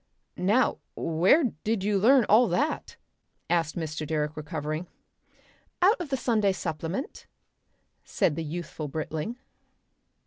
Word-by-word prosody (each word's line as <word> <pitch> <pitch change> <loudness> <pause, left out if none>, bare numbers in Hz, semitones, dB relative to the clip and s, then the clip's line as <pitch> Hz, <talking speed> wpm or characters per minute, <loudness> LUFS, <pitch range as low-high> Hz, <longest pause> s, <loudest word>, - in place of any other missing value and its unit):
"Now 210 +8 +2 0.2
where 175 - +3 0.2
did 215 -3 0
you 205 -1 +2
learn 245 +3 +5
all 230 +4 +6
that?" 260 - -1 0.5
asked 165 -2 +1
Mr. 155 -2 -3
Direck 150 0 -2
recovering. 155 +2 -4 0.9
"Out 375 +2 +4
of 330 - -5
the 270 - 0
Sunday 215 -6 +2
Supplement," 165 - -4 0.8
said 155 - 0
the 165 - -3
youthful 160 -1 -5
Britling. 155 - -4
175 Hz, 115 wpm, -27 LUFS, 155-225 Hz, 0.9 s, all